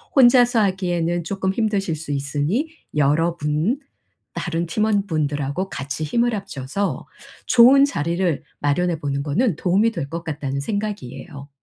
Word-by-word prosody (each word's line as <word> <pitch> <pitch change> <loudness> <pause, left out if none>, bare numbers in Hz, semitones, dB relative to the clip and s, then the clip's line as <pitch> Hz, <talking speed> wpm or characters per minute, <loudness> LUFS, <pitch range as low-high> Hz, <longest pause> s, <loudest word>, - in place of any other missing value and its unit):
혼자서 245 -2 +6
하기에는 175 -3 0
쪼끔 190 +2 -2
힘드실 200 -6 0
수 150 -1 -7
있으니 145 - -1 0.3
'여러분 155 - +1 0.5
다른 170 0 -2
팀원분들하고 165 -5 0
같이 140 +3 -4
힘을 235 +8 +1
합쳐서 195 0 -4 0.4
좋은 255 +3 +7
자리를 170 - -1 0.2
마련해 165 +3 +1
보는 140 -1 -2
거는 170 - +1
도움이 195 +6 +2
될 155 -10 -5
것 170 0 -4
같다.'는 140 -4 -3
생각이에요. 170 - -5
170 Hz, 305 characters per minute, -22 LUFS, 145-205 Hz, 0.5 s, 좋은